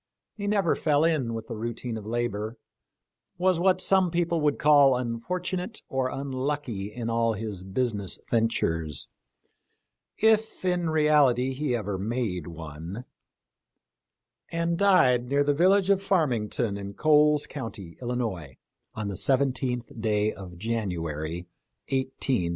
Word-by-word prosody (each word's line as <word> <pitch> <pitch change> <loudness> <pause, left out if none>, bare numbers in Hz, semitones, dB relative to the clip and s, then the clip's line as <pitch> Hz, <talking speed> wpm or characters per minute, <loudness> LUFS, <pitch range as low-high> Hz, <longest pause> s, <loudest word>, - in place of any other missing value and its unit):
He 205 -2 -4
never 200 -5 +2
fell 150 -1 +2
in 145 -9 +1
with 110 -1 -5
the 115 - -6
routine 115 +1 -4
of 110 -1 -7
labor; 115 -1 -2 0.8
was 180 -1 +2
what 185 +1 +3
some 190 -1 +3
people 170 -1 0
would 150 -1 +2
call 145 -3 +6
unfortunate 180 - -3
or 130 -1 0
unlucky 130 -6 -3
in 115 +1 -5
all 115 0 +1
his 105 -3 -5
business 100 0 -2
ventures 80 - 0 0.6
— - - -52 0.2
if 220 -3 -3
in 175 -2 +1
reality 145 -5 +3
he 135 -2 -1
ever 105 -4 -3
made 105 -5 -2
one 85 +7 -7 0.7
— - - -42
and 170 0 0
died 150 -11 +4
near 140 +1 +3
the 145 0 +2
village 190 +5 +4
of 195 -1 +3
Farmington 120 - 0
in 100 0 -7
Coles 150 -1 +4
county, 105 - -7
Illinois, 110 - -3 0.4
on 110 -2 -3
the 100 - -3
17th 125 0 0
day 105 -1 +1
of 90 -3 -10
January, 85 -6 -3 0.4
185 130 -3 -1
1. - - -2
125 Hz, 135 wpm, -27 LUFS, 105-150 Hz, 0.8 s, call